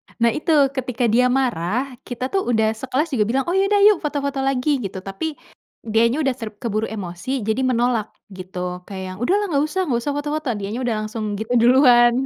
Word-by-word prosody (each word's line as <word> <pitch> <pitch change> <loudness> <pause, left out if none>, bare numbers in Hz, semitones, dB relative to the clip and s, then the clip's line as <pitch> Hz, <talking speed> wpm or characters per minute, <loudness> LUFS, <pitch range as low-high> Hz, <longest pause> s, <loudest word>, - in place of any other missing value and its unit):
Nah, 235 -1 +3
itu 310 +2 -2 0.2
ketika 255 -2 -3
dia 250 +2 +4
marah, 250 0 0
kita 255 +1 -4
tuh 385 -7 0
udah 220 -2 +2
sekelas 265 +7 -2
juga 225 -5 +2
bilang, 265 +3 +1
“Oh, 350 - 0
ya 390 +1 +3
udah, 410 0 +3
yuk 415 -3 +7
foto-foto 280 -2 -2
lagi." 270 +1 +1
Gitu. 195 -4 -5
Tapi, 290 +11 -4 0.5
dianya 230 +6 +2
udah 265 -2 +1
ter 225 -4 -6
keburu 220 -1 -2
emosi, 205 +5 -4
jadi 220 +4 +1
menolak 240 -3 +1 0.2
gitu. 180 -1 -6
Kayak 190 -2 -6
yang, - - -13
“Udahlah, 405 +7 +2
nggak 285 0 +2
usah 375 +5 -2
nggak 240 -3 +1
usah 290 - -1
foto-foto.” 295 -1 -2
Dianya 205 +4 -4
udah 235 -3 0
langsung 215 -1 -4
gitu 220 +3 -3
duluan. 240 -1 +6
245 Hz, 195 wpm, -21 LUFS, 220-280 Hz, 0.5 s, yuk